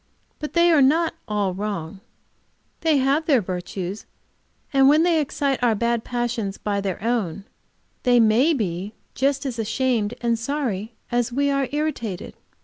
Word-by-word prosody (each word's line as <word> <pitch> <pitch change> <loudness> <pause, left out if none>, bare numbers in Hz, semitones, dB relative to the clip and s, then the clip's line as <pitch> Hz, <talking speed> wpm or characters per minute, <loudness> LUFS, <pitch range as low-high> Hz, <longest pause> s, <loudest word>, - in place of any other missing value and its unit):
But 300 - -5
they 340 0 +5
are 310 -3 +5
not 320 +6 +3
all 205 -3 0
wrong; 195 -3 -4 0.8
they 320 -3 +2
have 275 +4 +1
their 280 -6 +5
virtues, 185 0 -5 0.7
and 270 0 +6
when 305 +3 +5
they 335 -2 +3
excite 280 -2 -1
our 235 -3 +3
bad 235 +1 0
passions 240 -5 -2
by 200 -1 -2
their 195 0 -4
own, 205 -6 -1 0.6
they 245 -1 +4
may 230 +8 +4
be 195 -2 -3 0.3
as 275 -3 0
ashamed 225 -1 0
and 235 -1 0
sorry 230 -5 -3 0.2
as 240 0 +1
we 280 +3 +1
are 275 -1 +1
irritated. 280 - -3
240 Hz, 145 wpm, -23 LUFS, 205-280 Hz, 0.8 s, and